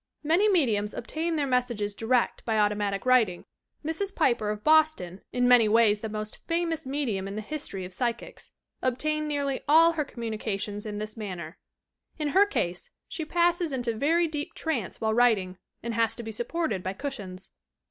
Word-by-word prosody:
Many 345 +8 +3
me 355 -8 +4
diums 210 -2 -1
obtain 325 +7 -2
their 295 -2 +1
messages 240 -6 0
direct 235 +3 0
by 225 -2 0
automatic 205 -1 0
writing. 235 -9 +3 0.4
Mrs. 385 +5 -2
Piper 235 -9 +2
of 210 0 -4
Boston, 310 - +3
in 245 0 +2
many 245 -3 +6
ways 210 -1 +4
the 220 - -4
most 215 0 -5
famous 330 -3 -1
medium 245 -9 -2
in 195 - -6
the 215 - -3
history 210 -8 -5
of 180 - -8
Psychics, 235 +2 -3 0.3
obtained 305 +5 0
nearly 280 -2 -1
all 325 +2 +7
her 320 -2 -1
communications 215 -4 -4
in 205 -1 -4
this 215 0 -5
manner. 180 -6 -6 0.6
In 300 -2 -1
her 390 +7 +5
case, 180 - -2 0.2
she 320 - -4
passes 345 0 +1
into 245 -3 -1
very 330 +8 +2
deep 300 -2 -5
trance 265 - -3
while 220 -1 0
writing 210 -6 +2 0.2
and 235 0 -3
has 230 -1 +1
to 235 - -7
be 225 - -5
supported 240 - -2
by 185 +1 -3
cushions. 195 -8 -7
240 Hz, 175 wpm, -27 LUFS, 210-305 Hz, 0.6 s, all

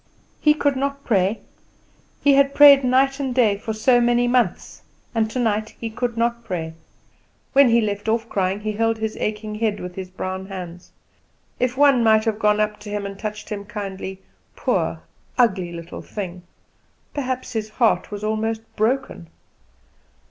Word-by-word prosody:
He 300 -1 +4
could 285 -2 +1
not 280 +1 -2
pray; 200 -1 +1 0.8
he 285 - +6
had 275 0 +3
prayed 280 -2 +8
night 265 +2 +2
and 265 -3 -2
day 225 -5 +4
for 220 - -4
so 240 +3 +3
many 240 0 +3
months; 240 -7 0 0.3
and 225 -2 +1
tonight 220 -3 -1
he 225 -1 -4
could 235 +1 -3
not 235 0 0
pray. 170 -7 -4 0.8
When 275 -2 +6
he 235 0 +4
left 205 0 -2
off 225 +1 0
crying, 195 -1 -1
he 215 0 -2
held 225 +1 0
his 220 0 -3
aching 215 0 -3
head 215 -1 -1
with 180 0 -7
his 185 0 -7
brown 185 0 -5
hands. 180 -2 -8 0.7
If 250 0 0
one 280 -4 +5
might 220 0 +4
have 220 -1 -1
gone 210 -1 +3
up 210 0 0
to 210 0 -10
him 205 -1 -3
and 195 0 -7
touched 215 -1 -6
him 205 -1 -4
kindly; 195 -2 -6 0.4
poor, - - -1 0.3
ugly 190 -8 +2
little 170 0 -8
thing! 185 -4 -6 0.7
Perhaps 255 -2 -3
his 215 -1 -3
heart 225 +1 +1
was 205 0 -6
almost 220 +1 -1
broken. 220 - -1
220 Hz, 165 wpm, -22 LUFS, 205-245 Hz, 0.8 s, prayed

